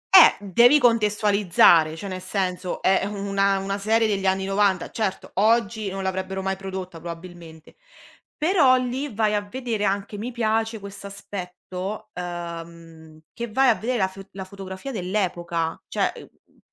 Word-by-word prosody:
Eh, - - +10
devi 235 - +5
contestualizzare, 205 - +4
cioè 195 +5 -7
nel 185 -1 -5
senso, 185 -1 -3
è 190 0 +3
una 200 -1 0
una 195 +1 -3
serie 225 +3 +2
degli 195 -2 0
anni 190 0 +1
'90. 195 -2 +1
Certo, 205 -4 -3
oggi 220 0 +2
non 195 0 -5
l'avrebbero 190 0 -3
mai 190 0 -1
prodotta 190 -3 -7
probabilmente. 170 - -10 0.6
Però 305 -5 +4
lì 255 +3 -2
vai 215 0 +1
a 205 - +1
vedere 220 -1 -3
anche 200 +1 -2
mi 240 +4 -4
piace 225 -1 0
questo 200 0 -9
aspetto, 195 +1 -7
ehm, 170 -2 -8
che 235 +1 -5
vai 265 +3 +4
a - - +6
vedere 245 +3 -2
la 190 -3 +2
fo 190 +1 -11
la 190 - -6
fotografia 190 +5 -8
dell'epoca. 175 -5 -2
Cioè, - - 0
è - - -11
mhmm, - - -21
195 Hz, 155 wpm, -24 LUFS, 185-215 Hz, 0.6 s, Eh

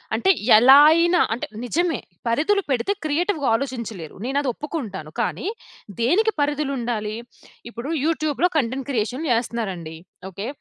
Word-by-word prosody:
అంటే 380 - +1 0.3
ఎలా 260 +5 +8
అయినా 340 +2 +3
అంటే, 235 - -5 0.2
నిజమే 330 +7 0 0.3
పరిధులు 315 - +2
పెడితే 255 +9 0
క్రియేటివ్‌గా 310 0 0
ఆలోచించలేరు. 225 - -5
నేనది 275 +1 0
ఒప్పుకుంటాను. 220 - -6
కానీ, - - -2 0.5
దేనికి 425 - +2
పరిధులుండాలి? 255 -7 -2 0.5
ఇప్పుడు 240 +4 -7 0.2
యూట్యూబ్‌లో 315 +1 +1
కంటెంట్ 265 0 -1
క్రియేషన్ 250 +4 -2
చేస్తన్నారండి. 200 -9 -2 0.3
ఓకె, 195 +4 -6
265 Hz, 115 wpm, -22 LUFS, 230-310 Hz, 0.5 s, ఎలా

